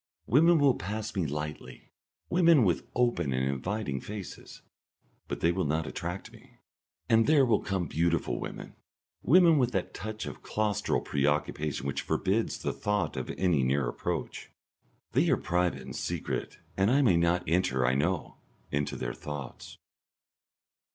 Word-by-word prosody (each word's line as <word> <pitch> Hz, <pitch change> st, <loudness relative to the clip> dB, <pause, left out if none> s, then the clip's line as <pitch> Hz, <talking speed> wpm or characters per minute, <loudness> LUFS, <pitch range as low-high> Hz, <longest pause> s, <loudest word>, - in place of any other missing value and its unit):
Women 165 Hz, +8 st, +5 dB
will 140 Hz, -3 st, +5 dB
pass 105 Hz, +3 st, -5 dB
me 90 Hz, -5 st, 0 dB
lightly, 75 Hz, -3 st, -6 dB, 0.4 s
women 170 Hz, -6 st, +5 dB
with 90 Hz, -3 st, 0 dB
open 120 Hz, -, +1 dB
and 65 Hz, +1 st, 0 dB
inviting 70 Hz, -, -2 dB
faces, 105 Hz, -3 st, -9 dB, 0.6 s
but -, -, -5 dB
they 85 Hz, -, +4 dB
will 95 Hz, +1 st, -1 dB
not 80 Hz, +2 st, 0 dB
attract 90 Hz, +4 st, -5 dB
me, -, -, -17 dB, 0.5 s
and 115 Hz, 0 st, +4 dB
there 150 Hz, -3 st, +5 dB
will 115 Hz, -4 st, +3 dB
come 95 Hz, -3 st, -2 dB
beautiful 85 Hz, +1 st, 0 dB
women, -, -, -7 dB, 0.5 s
women 165 Hz, +1 st, +6 dB
with 125 Hz, -2 st, +1 dB
that 95 Hz, -3 st, -2 dB
touch 110 Hz, +1 st, -5 dB
of -, -, -8 dB
claustral 105 Hz, -2 st, 0 dB
preoccupation 75 Hz, 0 st, -1 dB
which 70 Hz, -, -2 dB
forbids 100 Hz, +4 st, 0 dB
the -, -, -3 dB
thought 105 Hz, 0 st, -1 dB
of -, -, -4 dB
any 90 Hz, -7 st, +2 dB
near 65 Hz, 0 st, +1 dB
approach. -, -, -4 dB, 0.6 s
They -, -, +2 dB
are -, -, +4 dB
private 90 Hz, -6 st, 0 dB
and -, -, -8 dB
secret, -, -, -3 dB, 0.2 s
and 95 Hz, +2 st, +2 dB
I 140 Hz, +3 st, +4 dB
may 100 Hz, -9 st, +4 dB
not 85 Hz, +1 st, +2 dB
enter, 75 Hz, -7 st, +1 dB
I 65 Hz, -, +3 dB
know, 80 Hz, +6 st, -1 dB, 0.3 s
into 70 Hz, 0 st, -1 dB
their -, -, -3 dB
thoughts.... 75 Hz, -3 st, -8 dB
90 Hz, 150 wpm, -29 LUFS, 75-110 Hz, 0.6 s, women